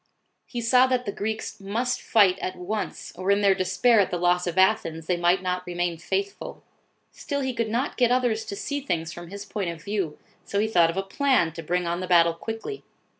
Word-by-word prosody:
He 240 - -4
saw 250 +3 +5
that 255 -1 0
the 200 - -2
Greeks 220 +1 -4
must 230 +6 -2
fight 200 -5 +4
at 185 - -4
once, 205 +4 -5
or 185 +2 -3
in 200 +1 +4
their 200 -1 +5
despair 190 +6 +3
at 200 - +3
the 180 - -2
loss 180 +1 +2
of 175 - -3
Athens, 185 -5 +2
they 180 - +1
might 175 +2 +2
not 180 0 -1
remain 175 -1 -2
faithful. 395 - -4 0.5
Still 285 -1 -4
he 260 -1 -1
could 230 -2 -1
not 240 +6 -1
get 245 -1 +3
others 245 -3 +1
to 205 - -5
see 285 +8 -3
things 165 - -2
from 175 0 -9
his 200 +3 -8
point 200 -3 -3
of 165 -2 -7
view, 195 -7 -2 0.3
so 200 - -4
he 215 - +2
thought 175 -6 +4
of 165 - -4
a 195 - 0
plan 250 - +2
to 165 - -7
bring 180 +2 -1
on 170 +1 -1
the 185 - -4
battle 170 -2 +5
quickly. 225 - -6
195 Hz, 225 wpm, -25 LUFS, 175-230 Hz, 0.5 s, saw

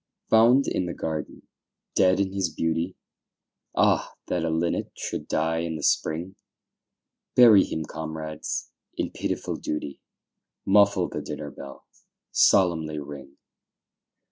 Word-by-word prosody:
Found 120 +5 +6
in 90 - -1
the 85 - -5
garden 80 -2 -5 0.5
dead 95 0 +4
in 95 -1 0
his 95 -3 0
beauty. 80 +3 -2 0.8
Ah! - - +2
that 85 - 0
a 85 - 0
linnet 80 +1 -1
should - - -5
die 80 +1 0
in 85 -1 -3
the 75 - -6
spring! 85 +5 0 1.0
Bury 110 -6 +8
him, 80 -1 -4
comrades, 80 0 -5 0.3
in - - -2
pitiful - - -3
duty, 75 -2 -5 0.6
Muffle 100 -2 +4
the - - -5
dinner 75 -1 -6
bell, 70 +1 -11 0.5
solemnly 80 -5 +3
ring. 70 -1 -9
80 Hz, 120 wpm, -25 LUFS, 80-95 Hz, 1.0 s, Bury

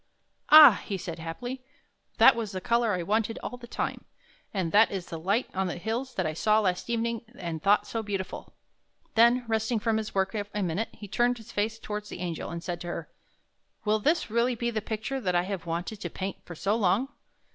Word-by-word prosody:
" - - -47
Ah," 300 -9 +10
he 195 - -3
said 170 -2 -6
happily, 245 +11 -5 0.3
" - - -42
that - - +8
was 220 -3 -4
the 185 - -2
color 235 +3 +1
I 180 -1 -1
wanted 220 +4 0
all 250 - -5
the 240 -1 -11
time! - - -3 0.5
And 185 -5 -2
that 215 +2 +6
is 190 -3 -4
the 165 - -7
light 200 +9 +1
on 190 0 0
the 175 - -4
hills 235 +7 -3
that 185 - 0
I 155 - -1
saw 215 +7 +3
last 185 0 -1
evening 230 -1 -1
and 165 -6 -5
thought 200 +1 +4
so 225 - -3
beautiful! 195 -3 -5 0.3
" - - -41
Then, 235 +2 +5
resting 220 +1 0
from 220 +1 +1
his 215 -2 -4
work 190 +2 +1
a 205 -1 -3
minute, 185 +6 -1
he 205 - -10
turned 240 +4 +1
his 225 - -12
face 215 +2 -1
again - - -26
toward 210 0 -4
the 210 - -8
Angel, 170 -2 -4
and 170 0 -6
said 175 -2 -4
to 175 - -6
her: 170 -1 -5 0.8
"Will 215 +1 +2
this 300 0 +1
really 235 +2 +2
be 235 +1 -1
the 220 -2 -2
picture 225 +5 -3
that 180 -5 0
I 175 - +3
have 185 -2 -5
wanted 175 +5 -4
to - - -3
paint 190 0 -5
for 175 - -8
so 200 +6 0
long? 225 +4 +2
210 Hz, 230 wpm, -28 LUFS, 185-230 Hz, 0.8 s, Ah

